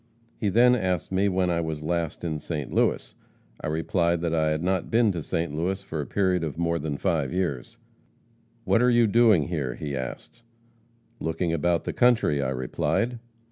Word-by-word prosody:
He 105 - 0
then 120 +5 +5
asked 95 -8 -1
me 95 +2 +2
when 90 -1 +1
I 85 0 0
was 80 -2 -4
last 85 0 -2
in 80 -3 -2
St. 75 -3 -5
Louis. - - +1 0.5
I - - -2
replied 85 +2 0
that 85 -1 -1
I 80 -1 +2
had 75 +1 -1
not 95 -1 0
been 115 -3 +3
in 85 - -3
St. 80 0 -2
Louis 90 +5 -1
for 80 -5 -4
a 70 - -6
period 95 -3 +1
of 75 -3 -4
more 85 0 0
than 75 -1 -3
five 75 -4 0
years. 85 -9 -3 0.9
'What 115 - +2
are 125 - +4
you 120 -1 +4
doing 110 -8 +4
here?' 75 -8 -2
he 70 -2 -5
asked. 65 - -7 0.8
'Looking 80 +1 -1
about 85 +1 +1
the - - -4
country,' 115 - +3
I 65 - -1
replied. 75 - -1
85 Hz, 185 wpm, -26 LUFS, 75-95 Hz, 0.9 s, then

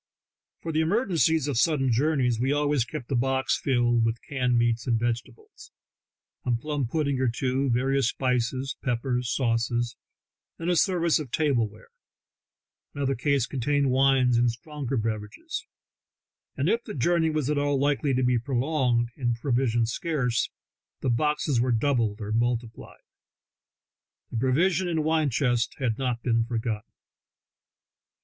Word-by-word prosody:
For 165 - -3
the 160 0 +1
emergencies 165 - +2
of 135 -5 0
sudden 135 -3 +2
jour 150 +7 +2
neys 125 -4 +1
we 130 +3 +1
always 145 -3 +1
kept 135 -1 -7
a - - +2
box 130 +2 +1
filled 120 -3 +2
with 115 0 0
canned 125 -3 0
meats 115 0 +1
and 115 -2 +2
vegetables, 120 - -5 0.7
a 125 - -1
plum 140 +2 -1
pudding 140 -1 -1
or 130 - +2
two, 130 +3 0
various 135 +1 +1
spices, 130 +1 -1
peppers 125 0 -1
and 125 - -3
sauces, 120 -1 0 0.6
and 170 +2 -1
a - - +2
service 170 -2 +2
of 150 -4 -6
table 130 -6 +1
ware; 105 +1 -17 1.1
another 140 -1 0
case 135 0 +1
contained 140 +2 0
wines 130 -2 +3
and 120 0 +3
stronger 135 +2 -4
beverages; 110 -2 -4 0.9
and 140 - 0
if 230 +5 +1
the - - -7
journey 160 +4 +2
was 155 -4 -1
at 150 -1 +1
all 145 -1 +1
likely 145 +1 +1
to 130 0 +1
be 125 -1 +2
prolonged 125 -1 0
and 120 -4 -1
provisions 120 -2 0
scarce, 125 -6 -1 0.5
the 130 - +1
boxes 150 0 +1
were 125 +1 +1
doubled 115 -3 +1
or 105 -1 -5
multiplied. 115 0 -2 1.3
The - - -3
provision 165 +9 +2
and 160 -3 0
wine 155 -1 +2
chcvsts 120 -2 0
had 120 -4 -1
not 125 -3 -2
been 115 -2 +2
forgotten. 115 -2 -3
130 Hz, 150 wpm, -26 LUFS, 120-145 Hz, 1.3 s, wines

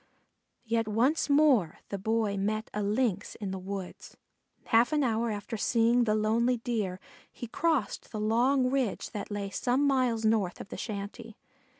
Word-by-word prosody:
Yet 225 -1 0
once 250 +10 +1
more 280 - +4
the 200 - -4
Boy 220 0 0
met 215 +3 -2
a 210 - -2
Lynx 205 -1 0
in 200 -3 -5
the 190 - -4
woods. 190 0 -7 0.5
Half 230 +4 +4
an 295 -1 +2
hour 230 -1 0
after 215 +2 -4
seeing 235 +2 +3
the 215 -1 +2
lonely 230 +3 +2
Deer 215 -6 -2 0.3
he - - -7
crossed 275 -2 -1
the 215 - -4
long 250 +4 +2
ridge 260 -7 -1
that 205 - -5
lay 205 -1 -4
some 255 +7 +1
miles 250 -5 +1
north 215 -5 +1
of - - -9
the - - -6
shanty. 215 +1 -6
225 Hz, 165 wpm, -29 LUFS, 205-245 Hz, 0.5 s, more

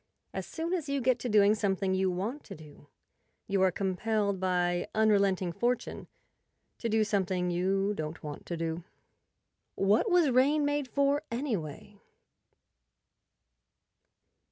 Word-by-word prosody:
As - - -4
soon 335 +2 -3
as 330 -6 -2
you 280 0 0
get 255 -1 +2
to 245 - -3
doing 210 -1 +5
something 195 -2 0
you 190 0 +1
want 205 +11 -3
to - - -9
do, 150 -2 -15 0.6
you 195 -1 +1
are 190 -1 +4
compelled 200 +1 -1
by 180 -1 0
unrelenting 200 -4 +3
Fortune 240 +6 -2 0.7
to 230 - -2
do 220 0 +3
something 190 -3 0
you 195 +3 +1
don't 155 -3 -6
want 150 -1 -7
to 170 - -3
do. 165 +1 -3 0.9
What 205 - +2
was 350 -6 +4
rain 285 +4 +3
made 290 -1 0
for, 280 +2 +1
anyway? 205 - -4
200 Hz, 130 wpm, -30 LUFS, 180-250 Hz, 0.9 s, doing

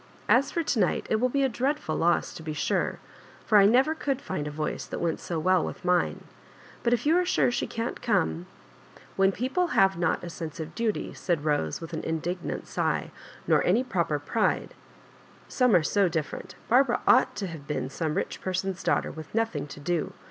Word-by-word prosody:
As 270 +3 +4
for 335 - -1
to 260 - 0
night 185 - +1
it 220 - +4
will 250 +3 +1
be 275 +2 +1
a - - +4
dreadful 260 - -1
loss 170 +1 +1
to - - -9
be 155 -1 -4
sure, - - 0 0.5
for 210 - +6
I 200 - +7
never 260 +8 +4
could 275 -4 -2
find 185 - -4
a - - -2
voice 150 +1 -3
that - - -5
went 170 -2 -1
so 170 - -4
well 185 +2 +3
with - - -6
mine. 180 -1 +1 0.6
But 235 - +1
if 245 - +1
you 315 +3 +4
are - - +2
sure 360 -8 +2
she - - -1
can't 230 +1 -4
come 80 - 0 0.2
— - - -26
" - - -25
" - - -23
When 195 0 +4
people 260 - 0
have 195 -2 +4
not 170 -2 0
a 175 - -5
sense 165 -2 -7
of 160 0 -6
duty," 230 -2 -2
said 170 -5 -1
Bose, 145 - 0
Wifth 165 0 -8
an 155 - -3
indignant 170 +2 -3
sigh, - - -1 0.3
"nor - - +3
any 245 - +3
proper 170 - 0
pride 145 +10 -1 0.3
— - - -26
» - - -26
Some 250 -6 +3
are 170 - +4
so 195 +3 +2
different 160 -3 -4
Barbara 245 +1 +3
ought 255 - +5
to 205 -1 -3
have 160 -5 -8
fieen 145 -2 -3
some 155 +1 -2
rich - - -3
person's 185 0 -2
daughter, - - +1
with 155 +4 -10
nothing 225 -11 0
to 145 - -10
do. 165 +2 -2
185 Hz, 220 wpm, -27 LUFS, 160-240 Hz, 0.6 s, I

